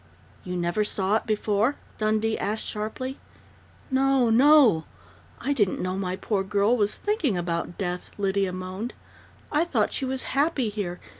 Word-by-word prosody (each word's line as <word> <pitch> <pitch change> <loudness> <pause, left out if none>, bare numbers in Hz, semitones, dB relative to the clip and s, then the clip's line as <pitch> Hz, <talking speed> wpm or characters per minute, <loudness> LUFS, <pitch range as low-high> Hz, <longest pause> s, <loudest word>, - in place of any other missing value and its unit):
"You 180 0 -4
never 175 +4 0
saw 205 0 +1
it - - -7
before?" 215 +4 +1 0.2
Dundee 215 +1 +1
asked 215 +2 -2
sharply. 240 +5 -4 0.7
"No, 265 -2 +3
no! 250 - +6 0.5
I 285 - 0
didn't 205 -9 +1
know 185 0 -2
my 185 -1 -2
poor 195 0 -1
girl 205 +4 +2
was 210 -3 +1
thinking 340 - 0
about 170 0 -3
death," 180 -2 -3
Lydia 195 -1 0
moaned. 185 +6 -5 0.6
"I 300 +2 +3
thought 345 - 0
she 270 - -1
was 260 0 -2
happy 275 -4 +1
here. 195 -4 -4
210 Hz, 150 wpm, -26 LUFS, 190-255 Hz, 0.7 s, no